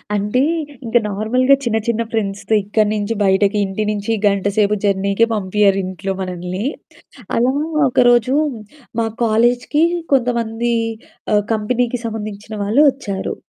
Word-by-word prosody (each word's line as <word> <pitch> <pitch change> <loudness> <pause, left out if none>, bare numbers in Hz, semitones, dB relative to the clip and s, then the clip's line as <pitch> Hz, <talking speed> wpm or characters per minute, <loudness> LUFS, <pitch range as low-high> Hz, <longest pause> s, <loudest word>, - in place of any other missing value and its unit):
అంటే 210 +5 0 0.4
ఇంక 230 +1 +2
నార్మల్‌గా 250 +7 +2
చిన్న, 225 -2 0
చిన్న 230 0 0
ఫ్రెండ్స్‌తో 200 -1 -2
ఇక్కడి 210 +1 +1
నుంచి 210 +2 -1
బయటకి 195 +2 +2
ఇంటి 195 +3 -3
నుంచి 205 +2 -3 0.2
గంటసేపు 200 +1 +1
జర్నీకే 200 +2 +2
పంపియ్యరింట్లో 195 -2 0
మనల్ని. 180 +2 -4 0.7
అలా 245 +3 +2 0.4
ఒకరోజు 245 +1 +3 0.7
మా 225 - +1 0.2
కాలేజ్‌కి 240 +7 +2 0.3
కొంతమంది 235 -2 +1 0.6
ఆహ్, 205 - +3
కంపెనీకి 235 +3 -1
సంబంధించిన 215 -1 -6
వాళ్ళు 230 +9 +3
ఒచ్చారు. 200 -8 -4
215 Hz, 110 wpm, -18 LUFS, 200-235 Hz, 0.7 s, ఒకరోజు